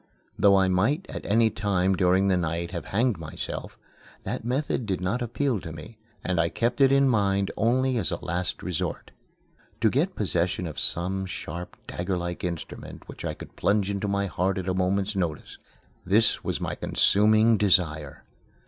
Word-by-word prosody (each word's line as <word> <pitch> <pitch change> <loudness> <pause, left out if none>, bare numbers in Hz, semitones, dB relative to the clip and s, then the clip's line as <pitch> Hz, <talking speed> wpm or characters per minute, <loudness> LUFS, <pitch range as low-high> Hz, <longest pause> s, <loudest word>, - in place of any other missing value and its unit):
Though 100 -1 +5
I 95 -1 +4
might 110 - +1
at - - -6
any 110 +2 +3
time 95 -2 +1
during 95 +2 +3
the 95 - +3
night 85 0 -2
have 85 - -5
hanged 115 -1 0
myself, 80 -2 -6 0.5
that - - -4
method 125 -1 -1
did 95 -2 -1
not 95 +7 -1
appeal 120 0 0
to 85 -3 -8
me, 80 +8 -10 0.2
and 90 -2 0
I 85 0 +2
kept 120 +7 -1
it 135 -1 +6
in 140 0 +5
mind 100 -5 +1
only 125 +3 +2
as 95 -9 +1
a - - -1
last 90 +1 -3
resort. 90 -4 -3 0.7
To 110 -2 +3
get 170 +8 0
possession 90 -3 0
of 80 -4 -5
some 95 +2 -1
sharp 90 -1 -7
dagger 90 +1 -3
like 85 0 -4
instrument 85 -3 -6
which - - -10
I - - -3
could - - -11
plunge 100 -1 +1
into 100 +1 -2
my 100 0 0
heart 95 0 -1
at 95 -1 -4
a 95 - +1
moment's 95 +3 0
notice 85 -5 -3 0.4
this 110 +4 +3
was - - -2
my - - -3
consuming 110 +2 +4
desire. 80 -8 +1
95 Hz, 175 wpm, -26 LUFS, 90-110 Hz, 0.7 s, it